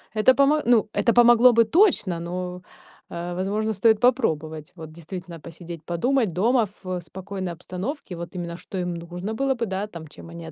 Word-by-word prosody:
это 215 +4 +5
помо 280 +3 +3
ну, 235 -3 +4
это 235 - +2
помогло 240 +1 +7
бы 230 0 +5
точно, 220 - +3
но, 180 +1 -5 0.5
а, 175 +1 -5
возможно 210 +4 -1
стоит 220 +2 +3
попробовать. 160 - 0
Вот, 160 -3 -10
действительно, 170 +1 -8
посидеть, 165 0 -10
подумать 220 +4 0
дома 225 +5 +2 0.2
в 185 -1 -3
спокойной 190 +2 -6
обстановке, 185 - -6
вот 170 +1 -8
именно, 170 -1 -5
что 190 - -8
им 180 -1 -2
нужно 175 +5 -6
было 270 +4 +1
бы, 235 - -2
да, 195 0 -3 0.2
чем 165 - -13
они 165 -1 -9
185 Hz, 170 wpm, -24 LUFS, 170-230 Hz, 0.5 s, помогло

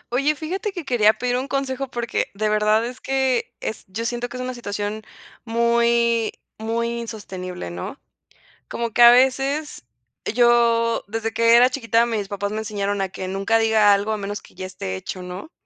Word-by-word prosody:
Oye, 290 +4 +2
fíjate 380 +8 -3
que 350 -5 -6
quería 220 -5 +4
pedir 250 +1 -1
un 260 +2 -3
consejo 275 -1 -2
porque 240 -2 -2
de 215 +2 0
verdad 215 +1 +2
es 250 +1 -7
que 265 -2 0
es 220 - -4
yo 220 +5 -5
siento 240 +1 -2
que 250 - -7
es 250 - -4
una 255 0 -4
situación 205 -2 -4 0.4
muy 235 0 +2 0.3
muy 235 +1 -2
insostenible, 185 - -6
¿no?, 90 0 -6 0.7
como 235 0 -3
que 240 +2 +4
a 235 - +11
veces 270 - +1 0.4
yo 235 -1 +3
desde 225 +2 -3
que 230 +1 +4
era 250 +1 +6
chiquita, 235 -3 +1
mis 215 -4 -2
papás 200 0 -3
me 215 - -3
enseñaron 205 -2 -2
a 190 - -1
que 185 0 -6
nunca 195 +4 +1
diga 220 -2 +5
algo 200 +2 0
a - - -2
menos 205 +1 -5
que - - -19
ya 185 - -6
esté 185 - -5
hecho, 185 - -6
¿no?, 180 - -8
230 Hz, 185 wpm, -22 LUFS, 205-245 Hz, 0.7 s, a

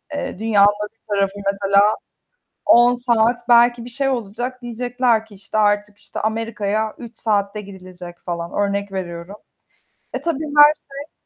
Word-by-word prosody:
eee, 285 - -5
dünyanın 210 -1 +3
bir 225 - -48 0.2
tarafı 200 0 0
mesela 200 0 +3 0.8
10 240 +1 +6
saat 240 0 +1
belki 240 0 +5
bir - - -8
şey 270 +3 -1
olacak. 245 +1 -4
Diyecekler 240 -1 0
ki 215 -2 -16
işte 200 +2 -6
artık 205 -1 +1
işte - - -8
Amerika'ya 220 -1 -2
3 235 -2 -11
saatte 210 -1 -1
gidilecek 185 -3 -11
falan. 170 -1 -5
Örnek 200 0 -1
veriyorum. 175 0 -6 0.8
Eee, - - -3
tabii 315 -2 -2
her 295 +1 +9
şey 280 +1 -11
215 Hz, 145 wpm, -20 LUFS, 200-240 Hz, 0.8 s, her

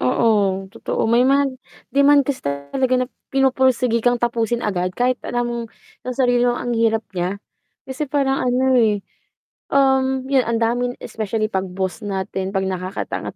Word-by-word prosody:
Oo, 195 - +2
totoo. - - -2
May 235 +2 +3
mga 275 0 +3 0.4
demand 280 0 +5
kasi 275 0 -2
talaga 140 - -1
na 255 0 0 0.2
pinupursigi 260 -3 +2
kang 245 +1 +2
tapusin 235 0 -1
agad 180 -3 0
kahit 250 +1 +1
alam 240 0 -2
mong 235 -1 -3 0.4
sa 255 +1 0
sarili 245 0 +3
mo 240 - 0
ang 245 - -3
hirap 225 -1 +1
niya. 180 +1 -2 0.5
Kasi 265 +2 -4
parang 270 -1 +1
ano, 255 +1 +2
eh, 210 -3 +1 0.7
um, 265 -1 +2
'yon, 270 -2 +3
ang 230 -1 0
daming 245 +2 0
especially 215 -1 -2
'pag 190 -2 -2
boss 190 +3 -3
natin, 190 -1 -3
'pag 195 -1 -1
nakakaangat-angat 185 0 -4
240 Hz, 155 wpm, -20 LUFS, 200-260 Hz, 0.7 s, demand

